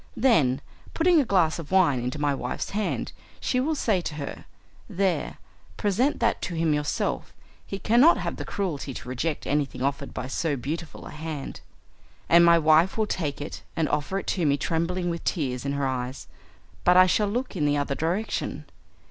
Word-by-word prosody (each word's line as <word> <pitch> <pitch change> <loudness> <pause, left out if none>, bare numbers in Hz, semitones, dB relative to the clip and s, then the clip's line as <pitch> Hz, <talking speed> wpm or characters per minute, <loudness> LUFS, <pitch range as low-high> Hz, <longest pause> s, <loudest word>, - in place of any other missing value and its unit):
Then, 145 - +3 0.3
putting 335 -1 +4
a - - -1
glass 175 -7 +2
of 160 - -7
wine 175 -9 +4
into 125 +3 -3
my 145 -1 +1
wife's 135 - -4
hand, 210 +1 -2 0.3
she 255 - 0
will 310 +5 0
say 210 -10 +1
to 160 - -5
her, 145 -2 -6 0.4
"There, 190 -1 -1 0.4
present 225 +8 +1
that 235 0 +1
to 175 - -4
him 165 -1 +2
yourself, 150 0 -2 0.3
he 195 - -4
cannot 240 - +5
have - - -3
the - - -4
cruelty 150 -9 -3
to - - -8
reject 140 +5 -2
anything 140 -3 -1
offered 140 0 -2
by - - -5
so 145 +3 -1
beautiful 155 +6 -5
a - - -8
hand," 155 -2 -6 0.7
and 170 +1 +7
my 170 0 +7
wife 160 +4 +4
will 220 - +2
take 155 -8 -3
it 145 - -6
and 160 -2 +1
offer 150 +6 -1
it - - -4
to 180 - -1
me 145 -2 +3
tremblingly 170 +4 -1
with 170 - -5
tears 130 -6 -2
in 140 - -1
her 140 -1 -1
eyes, 130 0 -4 0.6
but 180 0 +5
I 185 - +9
shall 205 +3 +2
look 245 +4 -3
in 150 -5 +1
the 145 0 +2
other 145 -1 -1
direction. 170 +10 -2
165 Hz, 190 wpm, -26 LUFS, 145-195 Hz, 0.7 s, I